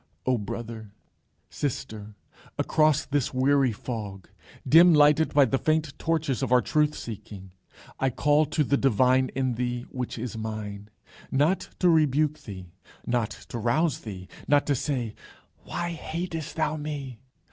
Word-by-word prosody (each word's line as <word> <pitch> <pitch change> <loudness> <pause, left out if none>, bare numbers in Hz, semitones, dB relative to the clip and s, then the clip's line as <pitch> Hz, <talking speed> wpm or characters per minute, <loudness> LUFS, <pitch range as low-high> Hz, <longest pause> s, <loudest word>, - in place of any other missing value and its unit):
O 130 - +3
brother, 110 0 -7 0.6
sister, 110 -6 -4 0.4
across 155 -1 +2
this 140 -2 -1
weary 135 0 +3
fog, 105 -4 -6 0.4
dim 165 +4 +7
lighted 150 +1 +5
by 145 -2 +5
the 135 +1 0
faint 155 -2 0
torches 155 -5 0
of 130 -3 -2
our 125 - +6
truth 150 +3 +1
seeking, 100 -4 -8 0.5
I 135 - +2
call 145 +4 +2
to 150 +1 +1
the 140 +1 +1
divine 130 0 +3
in 130 -2 0
thee, 120 0 -2
which 125 -2 -4
is 115 -1 -5
mine, 105 -2 -6 0.4
not 150 +8 +1
to 180 - +2
rebuke 155 -2 +3
thee, 95 -4 -9 0.3
not 120 -3 0 0.2
to 120 - -4
rouse 140 +7 +1
thee, 95 -4 -8 0.2
not 145 -1 +4
to 145 - +1
say 125 -5 -2 0.5
"Why 175 0 -3
hatest 165 -1 -5
thou 155 -1 0
me?" 145 -5 -6
130 Hz, 145 wpm, -26 LUFS, 115-150 Hz, 0.6 s, dim